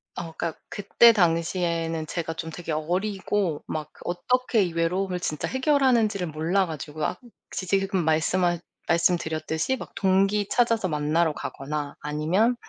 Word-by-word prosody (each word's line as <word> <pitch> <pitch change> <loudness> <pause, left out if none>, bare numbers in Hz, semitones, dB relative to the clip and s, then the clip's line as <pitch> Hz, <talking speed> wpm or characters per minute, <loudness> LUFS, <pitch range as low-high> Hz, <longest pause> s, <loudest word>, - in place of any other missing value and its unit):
어 165 -2 -5
그니까 165 -2 -3
그때 210 +3 +5
당시에는 165 -3 0
제가 165 0 -3
좀 160 0 -6
되게 165 0 -6
어리고 185 +1 -1
막 155 -2 -3
그 - - -19
어떻게 245 +6 +1
이 175 -2 -3
외로움을 180 +2 0
진짜 155 -4 -2
해결하는지를 255 - +2
몰라 165 +6 +1
가지고 155 0 -6
아 - - -2 0.3
혹시 185 - -5
지금 195 -1 +1
말씀하 175 +3 +2 0.3
말씀드렸듯이 165 - +1
막 - - -9
동기 195 +1 +2
찾아서 230 -5 +2
만나러 155 +1 +1
가거나 145 +1 -5
아니면 165 +11 +1
175 Hz, 330 characters per minute, -25 LUFS, 160-195 Hz, 0.3 s, 그때